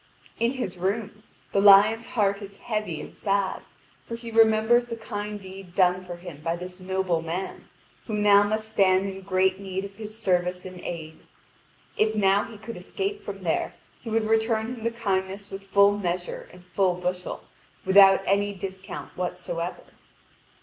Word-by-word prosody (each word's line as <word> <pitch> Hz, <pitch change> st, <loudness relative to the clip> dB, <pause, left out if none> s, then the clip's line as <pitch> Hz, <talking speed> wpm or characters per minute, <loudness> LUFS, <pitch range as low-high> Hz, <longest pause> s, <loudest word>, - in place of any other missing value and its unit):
In 235 Hz, +2 st, +2 dB
his 195 Hz, -9 st, -4 dB
room, 205 Hz, +3 st, -2 dB, 0.3 s
the 195 Hz, -, +2 dB
lion's 210 Hz, +3 st, +7 dB
heart 200 Hz, -2 st, +1 dB
is 200 Hz, 0 st, -10 dB
heavy 215 Hz, -8 st, -3 dB
and -, -, -9 dB
sad, 200 Hz, -2 st, 0 dB, 0.4 s
for 230 Hz, -, -6 dB
he 230 Hz, 0 st, -8 dB
remembers 225 Hz, +2 st, +4 dB
the 230 Hz, -, -4 dB
kind 210 Hz, -2 st, -5 dB
deed 190 Hz, -2 st, -11 dB
done 180 Hz, -1 st, +3 dB
for 180 Hz, -1 st, -7 dB
him 175 Hz, -4 st, -10 dB
by 165 Hz, +1 st, 0 dB
this 180 Hz, +1 st, -8 dB
noble 185 Hz, -2 st, -1 dB
man, 170 Hz, +4 st, -5 dB, 0.4 s
who 215 Hz, -, -2 dB
now 205 Hz, -1 st, +6 dB
must 215 Hz, +1 st, -1 dB
stand 195 Hz, -3 st, +3 dB
in 195 Hz, -1 st, -5 dB
great 190 Hz, 0 st, +1 dB
need 190 Hz, 0 st, -4 dB
of 195 Hz, 0 st, -11 dB
his 215 Hz, 0 st, -8 dB
service 180 Hz, -3 st, 0 dB
and 185 Hz, -1 st, -8 dB
aid. 160 Hz, -3 st, -7 dB, 0.8 s
If 215 Hz, 0 st, +2 dB
now 200 Hz, -1 st, +3 dB
he 225 Hz, -, -11 dB
could 220 Hz, +1 st, -8 dB
escape 395 Hz, -, -4 dB
from -, -, -7 dB
there, -, -, -1 dB, 0.3 s
he 230 Hz, -, -7 dB
would 225 Hz, 0 st, +1 dB
return 220 Hz, +1 st, +1 dB
him 230 Hz, -3 st, -9 dB
the 230 Hz, -, +2 dB
kindness 200 Hz, -3 st, -2 dB
with 195 Hz, 0 st, -8 dB
full 200 Hz, +1 st, +5 dB
measure 175 Hz, -2 st, -3 dB
and 180 Hz, 0 st, -16 dB
full 185 Hz, 0 st, +1 dB
bushel, 180 Hz, 0 st, -4 dB, 0.4 s
without 195 Hz, 0 st, +7 dB
any 200 Hz, +1 st, +1 dB
discount 190 Hz, 0 st, -7 dB
whatsoever. 180 Hz, -1 st, -4 dB
195 Hz, 170 wpm, -26 LUFS, 185-215 Hz, 0.8 s, lion's